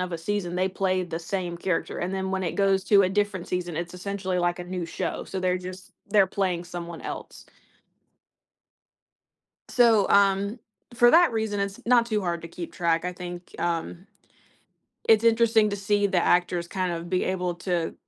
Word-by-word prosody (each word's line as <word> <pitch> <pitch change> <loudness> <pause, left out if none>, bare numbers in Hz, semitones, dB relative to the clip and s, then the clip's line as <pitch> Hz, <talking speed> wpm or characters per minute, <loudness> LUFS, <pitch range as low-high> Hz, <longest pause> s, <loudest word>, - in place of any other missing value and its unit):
of 180 -1 -3
a 170 - -3
season, 180 0 -2
they 185 +1 +1
play 185 -1 0
the 170 -2 -4
same 175 0 -3
character, 175 0 -2
and 180 +2 -2
then 190 0 -2
when 190 0 -1
it 170 - -2
goes 195 -1 +2
to 200 -2 +5
a 185 - +2
different 195 -2 -1
season, 175 -2 -3
it's 170 +1 -4
essentially 190 0 -3
like 175 +1 0
a 180 - -5
new 180 -1 -4
show, 165 - -4
so 190 - -5
they're 185 0 +1
just 185 +1 -9 0.2
they're 200 -1 +5
playing 185 -4 -1
someone 170 -1 -7
else. - - -8 2.2
So, 230 -5 +4
um, 200 +2 +3 0.4
for 240 +1 +6
that 340 -2 +6
reason, 220 -2 -1
it's 200 0 -3
not 235 -1 +4
too 215 -2 0
hard 170 -3 -2
to 165 - -7
keep 170 0 -8
track. 170 -1 0
I 180 - -2
think, 175 0 -9
um, 170 +2 -3 1.0
it's 220 0 +6
interesting 225 -1 +4
to 200 - -2
see 205 0 +1
the 185 -3 +1
actors 175 -1 +2
kind 185 -1 -2
of 170 +1 -6
be 185 0 0
able 180 -2 -1
to 175 -1 -2
185 Hz, 185 wpm, -26 LUFS, 175-200 Hz, 2.2 s, for